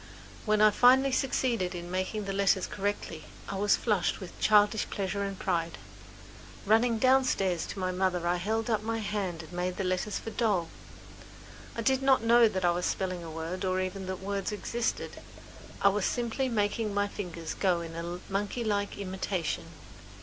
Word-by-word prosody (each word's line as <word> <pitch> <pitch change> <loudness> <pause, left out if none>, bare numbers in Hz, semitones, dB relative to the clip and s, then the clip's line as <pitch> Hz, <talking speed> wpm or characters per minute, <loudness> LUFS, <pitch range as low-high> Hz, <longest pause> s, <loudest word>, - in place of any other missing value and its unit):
When 215 0 +3
I 215 0 +7
finally 260 +5 +5
succeeded 245 -8 0
in 175 0 -6
making 185 +3 -2
the 195 - -3
letters 195 -1 +2
correctly 200 -5 -3 0.2
I - - -4
was 205 +1 +4
flushed 210 -6 0
with 185 - -10
childish 210 0 +4
pleasure 200 0 -2
and 195 -1 -4
pride. 170 -3 -1 0.9
Running 225 +3 +3
downstairs 250 -8 +2
to - - -7
my 185 -1 -1
mother 180 -2 0
I 175 +1 +2
held 220 +5 -1
up 220 -3 +1
my 225 +1 -2
hand 200 -6 -3
and 160 +2 -13
made 180 +1 -2
the 195 - -1
letters 185 +3 -1
for 225 - -6
doll. 200 -7 0 1.1
I 230 - -3
did 265 +3 +2
not 265 -4 +4
know 235 0 +6
that 190 -3 -1
I 175 - +5
was 175 +1 -1
spelling 185 -2 -2
a 165 - -7
word 165 +4 -5
or 185 0 +1
even 185 0 -3
that 185 0 -4
words 200 0 -2
existed; 230 +3 -3 0.6
I 200 - +7
was 200 0 0
simply 245 +2 -1
making 210 -1 0
my 205 0 +2
fingers 170 -6 -6
go 180 -3 +1
in 170 +2 -6
monkey 205 +4 -2
like 205 -2 -1
imitation. 185 -4 -3
200 Hz, 175 wpm, -29 LUFS, 180-220 Hz, 1.1 s, I